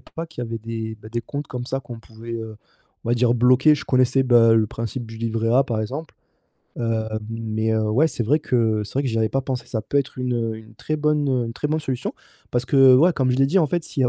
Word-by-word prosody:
pas 165 - -7
qu'il 160 -7 -7
y - - -3
avait 115 0 -4
des, 110 0 -5
bah, 110 - -11
des 120 +1 -2
comptes 140 +5 -6
comme 125 -2 -6
ça 135 - -2
qu'on 120 -2 -9
pouvait 115 +1 -10
heu, 110 -1 -6 0.5
on - - -5
va - - +4
dire 120 0 +2
«bloquer». 125 +5 +5
Je 145 - -6
connaissais 130 +1 +3
bah 120 -3 +5
le 110 -1 +3
principe 115 +3 -5
du 110 0 -10
livret 115 0 -1
A 130 +3 +5
par 120 -5 -3
exemple, 140 +9 -6 0.6
heu, 115 -2 -1 0.3
mais 110 -1 -2
heu, 110 -1 0
ouais, 135 +10 +3
c'est 120 - -3
vrai 150 +8 +2
que 115 -6 +1
c'est 105 - -9
vrai 140 - +1
que - - 0
j'y 115 -1 -1
avais 110 -1 +2
pas 135 - 0
pensé, 130 -2 -4
ça 110 -3 -3
peut 140 +6 0
être 135 -1 -3
une, 125 -1 -1
heu, 115 -2 -2
une 110 0 -14
très 155 +7 -3
bonne 150 -1 +1 0.2
une 115 - -5
très 145 +5 -3
bonne 155 +1 0
solution. 130 -5 -3 0.4
Parce 120 0 0
que, 135 0 +6
ouais, 170 +7 +5
comme 130 -5 +1
je 125 - +1
l'ai 135 +1 +4
dit, 185 +7 +3
en 160 - +3
fait, 175 +1 -1
s'il - - -4
y - - +4
a - - +2
120 Hz, 275 wpm, -22 LUFS, 115-135 Hz, 0.6 s, que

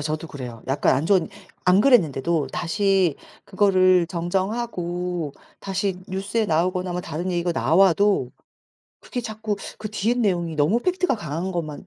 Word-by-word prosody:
저도 155 +2 -3
그래요. 125 -7 -8
약간 135 -1 +2
안 140 - -1
좋은 185 0 +2 0.4
안 180 +2 +6
그랬는데도 165 - +3
다시 190 +2 +1 0.3
그거를 185 -3 +3
정정하고 180 -3 -2 0.3
다시 195 -1 -2
뉴스에 200 +4 -1
나오거나 180 +3 0
뭐 180 - -2
다른 175 +5 -4
얘기가 175 0 0
나와도 190 -3 +3 0.7
그게 245 - -5
자꾸 220 -2 -4 0.2
그 215 -1 -6
뒤에 215 +3 0
내용이 180 -9 0
너무 155 +10 +2
팩트가 360 -3 0
강한 170 -1 -4
것만 160 -5 -5
180 Hz, 315 characters per minute, -23 LUFS, 165-205 Hz, 0.7 s, 안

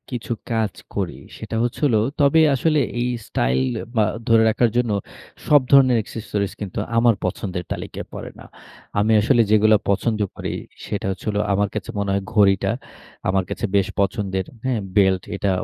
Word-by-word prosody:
কিছু 120 0 -3 0.2
কাজ 110 -4 0 0.2
করি। - - -2 0.2
সেটা 115 - -6
হচ্ছে 120 +4 -3
হল 120 - +3 0.2
তবে 145 +3 +5
আসলে 155 +3 +2 0.2
এই 120 - 0 0.2
স্টাইল 65 +2 +1 0.3
বা 110 - +4 0.2
ধরে 115 -1 +5
রাখার 120 +2 +2
জন্য 120 -3 +1 0.6
সব 145 -2 +6
ধরনের 130 -3 +6
accessories 105 -3 -4
কিন্তু 95 -3 -6 0.2
আমার 115 -1 +4
পছন্দের 90 0 -3
তালিকায় - - -5
পড়ে - - -6
না। - - -12 0.5
আমি 110 +2 +2
আসলে 120 +2 +4
যেগুলা 110 0 +5
পছন্দ 110 +2 +1 0.2
করি, - - -4 0.3
সেটা 100 - -3
হচ্ছে 95 - -8
হল, 105 - -1 0.2
আমার 100 0 +1
কাছে 110 - -4
মনে 100 - -1
হয় 100 0 0
ঘড়িটা, 100 -3 +3 0.6
আমার 95 -1 +2
কাছে - - -3
বেশ 100 +1 +3
পছন্দের, 95 -2 -1 0.2
হ্যাঁ? 125 -4 0 0.2
বেল্ট, 95 -3 +3
এটা 100 0 -1
110 Hz, 165 wpm, -22 LUFS, 100-120 Hz, 0.6 s, সব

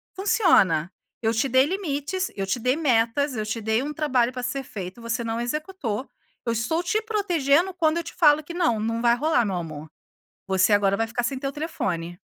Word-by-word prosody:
funciona. 195 - +3 0.3
Eu 225 0 +1
te 230 +4 +1
dei 260 +1 +4
limites, 370 +1 -2
eu 195 -1 -2
te 240 +6 -1
dei 250 +3 +1
metas, 265 -1 +1
eu 215 -1 -2
te 220 +2 -3
dei 220 +3 +1
um 295 +2 -4
trabalho 260 -5 +1
para 250 0 -5
ser 270 +2 -3
feito, 200 -2 -8
você 235 +1 -2
não 225 0 -2
executou, 270 - -3 0.4
eu 230 - 0
estou 275 +10 -1
te 425 +5 0
protegendo 365 -6 +1
quando 325 -2 +1
eu 340 - -1
te - - -9
falo 305 -3 +4
que 340 - -8
não, 330 -11 +1
não 230 +1 -1
vai 235 0 +4
rolar 265 -4 +2
meu 195 - -2
amor. 155 -3 -6 0.6
Você 190 +2 +3
agora 200 -1 +3
vai 225 - +1
ficar 240 +1 -2
sem 260 +3 -2
teu 275 +1 -3
telefone. 175 - -3
250 Hz, 205 wpm, -24 LUFS, 220-310 Hz, 0.6 s, dei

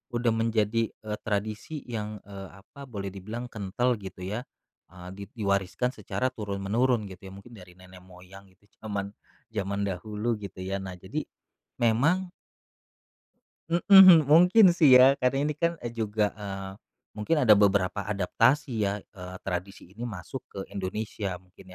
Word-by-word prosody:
udah 120 -1 +1
menjadi, 115 0 0
eee, 105 -1 -7
tradisi 110 +8 -3
yang, 105 -2 -5
eee, 95 -2 -9
apa 140 +5 -13
boleh 100 -5 -6
dibilang 110 +6 -6
kental 115 +4 -1
gitu 95 -2 -9
ya, 105 +5 -3 0.5
eee, 90 -1 -11
di 100 - -8
diwariskan 100 +2 -1
secara 130 - -2
turun 100 -4 -5
menurun 115 +3 +1
gitu 95 +1 -11
ya - - -12
mungkin 110 +5 -14
dari 90 -3 -14
nenek 90 0 -14
moyang 95 +2 -15
itu 95 - -31 0.2
zaman 100 -2 -4 0.4
zaman 100 -1 -2
dahulu 105 +4 -3
gitu 95 -2 -9
ya. 95 +1 -2
Nah 95 -1 -7
jadi - - -4 0.6
memang 145 +11 +2 1.4
mhm, 175 -1 +8
mungkin 180 +7 +6
sih 150 -7 +6
ya 130 +2 +8
karena 135 +2 +1
ini 150 - 0
kan, 170 +3 -1
eee, 120 - -4
juga, 105 -2 -1
eee, 95 -2 -7 0.4
mungkin 105 +10 -1
ada 110 - +7
beberapa 100 -2 +3
adaptasi 115 +8 +1 0.2
ya, 100 - -2 0.2
eee, 90 -2 -9
tradisi 95 0 -5
ini 120 +4 -6
masuk 110 +5 -7
ke 100 - -8
Indonesia 100 0 -4
mungkin 90 +1 -18
105 Hz, 150 wpm, -27 LUFS, 95-120 Hz, 1.4 s, mhm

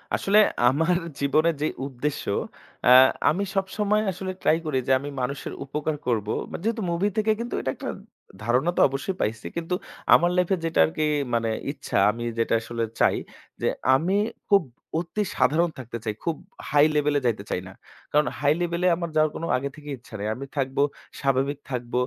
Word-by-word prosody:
আসলে 205 +2 +4 0.3
আমার 165 +7 +2 0.2
জীবনের 155 +4 +2
যে 155 - +2 0.2
উদ্দেশ্য 140 +2 -3 0.6
আ - - +8 0.4
আমি 195 +5 0
সবসময় 205 +2 +1
আসলে 185 +1 -5
ট্রাই 155 - +4
করি 150 -4 0
যে - - +2
আমি 140 +2 -6
মানুষের 140 +3 -3
উপকার 150 +2 -2
করব। 110 -4 0 0.2
মা - - -4
যেহেতু 225 +1 0
মুভি 170 +4 +1
থেকে 215 0 +3
কিন্তু 240 +1 -4
এটা 130 - -1
একটা - - -5 0.5
ধারণা 125 +9 +2
তো - - +4
অবশ্যই 135 +8 -3
পাইছি। 110 +1 -2
কিন্তু 170 +1 -2 0.4
আমার 175 - +6
লাইফ 180 -1 +2
এ - - -7
যেটা 165 - 0
আরকি 155 -1 -1 0.3
মানে 115 -1 +1 0.2
ইচ্ছা 145 - -4
আমি 120 +2 -6
যেটা 115 - +1
আসলে 115 +1 -3 0.2
চাই - - +4 0.4
যে - - +1 0.3
আমি 175 +8 +1 0.3
খুব 200 -3 +5 0.4
অতি 180 +5 -2
সাধারণ 155 +7 +3
থাকতে 120 -2 -6
চাই, 110 -2 -2
খুব 165 -2 0 0.3
হাই 145 0 +5
লেভেলে 145 -1 +2
যাইতে 110 -4 0
চাই 90 - -1
না। 95 - -11 0.4
কারণ 150 -3 +3
হাই 145 0 +4
লেভেলে 175 +1 0
আমার 170 0 -4
যাওয়ার 155 -1 +3
কোনো 165 - -3
আগে 140 +2 -3
থেকেই 150 -2 -7
ইচ্ছা 120 -2 -19
নেই। 105 - -2
আমি 135 +3 -6
থাকব 135 0 -1 0.4
স্বাভাবিক 135 +1 +1
থাকব। 120 -1 -4
150 Hz, 180 wpm, -25 LUFS, 130-175 Hz, 0.6 s, আ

